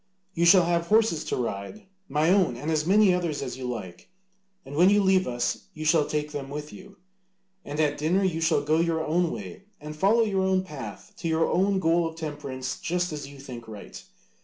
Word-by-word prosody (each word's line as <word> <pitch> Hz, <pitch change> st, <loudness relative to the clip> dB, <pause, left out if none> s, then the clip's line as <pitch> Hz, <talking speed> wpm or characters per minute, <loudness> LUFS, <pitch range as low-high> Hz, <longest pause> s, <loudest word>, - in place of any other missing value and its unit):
You 170 Hz, -1 st, +1 dB
shall 180 Hz, 0 st, +7 dB
have 170 Hz, 0 st, 0 dB
horses 215 Hz, -6 st, +3 dB
to -, -, -2 dB
ride, 120 Hz, -, -5 dB, 0.2 s
my 150 Hz, +4 st, +2 dB
own 185 Hz, -10 st, +3 dB
and 150 Hz, +6 st, -3 dB
as 155 Hz, 0 st, 0 dB
many 200 Hz, 0 st, +5 dB
others 170 Hz, -6 st, -2 dB
as 130 Hz, -, -5 dB
you 130 Hz, -1 st, -7 dB
like, 95 Hz, -8 st, -7 dB, 0.6 s
and 135 Hz, +2 st, -8 dB
when 175 Hz, +5 st, +6 dB
you 205 Hz, +1 st, +4 dB
leave 190 Hz, -1 st, +3 dB
us 120 Hz, -1 st, -2 dB
you 155 Hz, 0 st, -6 dB
shall 155 Hz, -1 st, +3 dB
take 150 Hz, 0 st, -2 dB
them 140 Hz, -2 st, -6 dB
with 150 Hz, +1 st, -7 dB
you. 200 Hz, 0 st, -13 dB, 0.7 s
And 145 Hz, +1 st, -6 dB
at 150 Hz, -2 st, +1 dB
dinner 175 Hz, +6 st, +1 dB
you 170 Hz, -4 st, 0 dB
shall 160 Hz, -3 st, +2 dB
go 155 Hz, +2 st, +2 dB
your 165 Hz, -1 st, 0 dB
own 175 Hz, +3 st, +2 dB
away 195 Hz, +3 st, -7 dB
and 150 Hz, +1 st, -8 dB
follow 205 Hz, +8 st, +3 dB
your 195 Hz, -3 st, 0 dB
own 190 Hz, 0 st, +1 dB
path 160 Hz, +5 st, -9 dB
to 175 Hz, -, -4 dB
your 160 Hz, 0 st, +2 dB
own 195 Hz, +2 st, +2 dB
goal 170 Hz, -1 st, +2 dB
of 160 Hz, -, -8 dB
temperance 145 Hz, -5 st, -5 dB
just 180 Hz, -1 st, -1 dB
as 145 Hz, -2 st, -6 dB
you 140 Hz, 0 st, -12 dB
think 125 Hz, -4 st, -9 dB
right. 105 Hz, -2 st, -10 dB
160 Hz, 210 wpm, -26 LUFS, 145-185 Hz, 0.7 s, shall